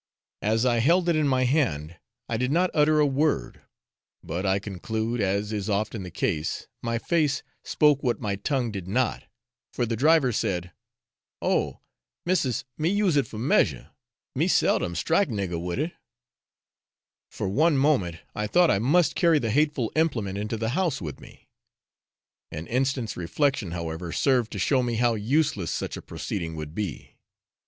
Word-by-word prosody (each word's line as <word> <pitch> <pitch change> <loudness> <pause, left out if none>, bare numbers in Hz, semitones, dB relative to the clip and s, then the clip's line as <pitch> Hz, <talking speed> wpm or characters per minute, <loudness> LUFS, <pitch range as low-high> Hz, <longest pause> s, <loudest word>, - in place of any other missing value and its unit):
As 110 +3 +1
I 120 -2 +3
held 170 +8 +3
it 170 - +3
in 155 -2 +2
my 130 -1 +2
hand, 120 - 0 0.3
I 115 - -2
did 125 +3 0
not 180 +4 +2
utter 155 0 +4
a 150 - +5
word; 145 +2 0 0.6
but 90 +4 -3
I 95 +1 +3
conclude, 110 +4 -3
as 100 +2 0
is 105 -1 -3
often 105 +1 -1
the 90 - -6
case, 80 -1 -2
my 115 0 -1
face 150 +2 0 0.2
spoke 150 -2 +3
what 120 -3 0
my 100 -3 -2
tongue 125 +2 -1
did 95 -3 -6
not, 120 +5 0 0.5
for 120 - -1
the 115 0 -2
driver 145 +1 +4
said, 90 -4 -2 0.7
'Oh! - - 0 0.4
Missis, 165 -9 0
me 155 +2 +2
use 200 -4 +2
it 140 - +2
for 110 - -9
measure 125 +7 +1 0.4
me - - +1
seldom 85 - +2
strike 165 - +2
nigger 95 -6 -3
with 90 -1 -3
it.' 155 +5 -2 1.4
For - - -4
one 150 - +3
moment 130 - +2 0.2
I 105 0 -2
thought 175 +8 +4
I 100 - +2
must 150 - +3
carry 170 -2 +4
the 115 -6 -1
hateful 145 -3 +1
implement 125 -12 0
into 105 +2 -3
the 110 0 -1
house 160 0 0
with 75 -7 -6
me. - - -16 1.0
An 80 - -6
instant's 130 0 -1
reflection, 115 - 0
however, 85 0 -5
served 125 - +1
to - - -4
show 115 +8 +2
me 120 -1 -1
how 120 +1 +2
useless 110 - 0
such - - -3
a - - -7
proceeding 85 -4 -5
would 75 -1 -6
be. 100 -4 -5
120 Hz, 165 wpm, -26 LUFS, 100-145 Hz, 1.4 s, a